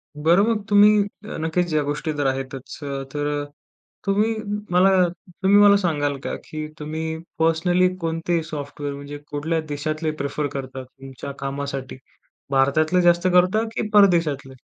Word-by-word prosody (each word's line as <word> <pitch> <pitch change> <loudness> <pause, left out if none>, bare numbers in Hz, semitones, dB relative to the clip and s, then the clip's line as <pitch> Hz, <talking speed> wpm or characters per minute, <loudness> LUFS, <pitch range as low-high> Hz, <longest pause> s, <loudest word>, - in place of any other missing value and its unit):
बरं, 165 +6 +4
मग 210 - -4
तुम्ही 205 0 +7 0.4
अ, - - -5
नक्कीच 165 +1 -1
या 150 - +3
गोष्टी 150 +2 -2
तर 145 - +1
आहेतच. 135 0 -4
अ, 140 -1 -4
तर 145 0 -1 0.6
तुम्ही 210 +3 +2 0.4
मला 180 +2 +5 0.5
तुम्ही 200 +2 +5
मला 205 0 +7
सांगाल 145 -7 0
का, - - -3
की 155 0 -5
तुम्ही 160 +1 -4 0.2
पर्सनली 175 +3 +3
कोणते 165 +1 -1
सॉफ्टवेअर 145 -1 -5
म्हणजे 140 +1 -8
कुठल्या 160 +3 -1
देशातले 155 +2 -2
प्रिफर 145 +1 -2
करता 130 -1 -6
तुमच्या 135 +1 -10
कामासाठी, 135 -1 -4 0.5
भारतातले 155 +6 +3
जास्त 175 +1 +4
करता, 185 +5 +4
की 215 - -1
परदेशातले? 165 -9 +3
155 Hz, 140 wpm, -22 LUFS, 140-175 Hz, 0.6 s, तुम्ही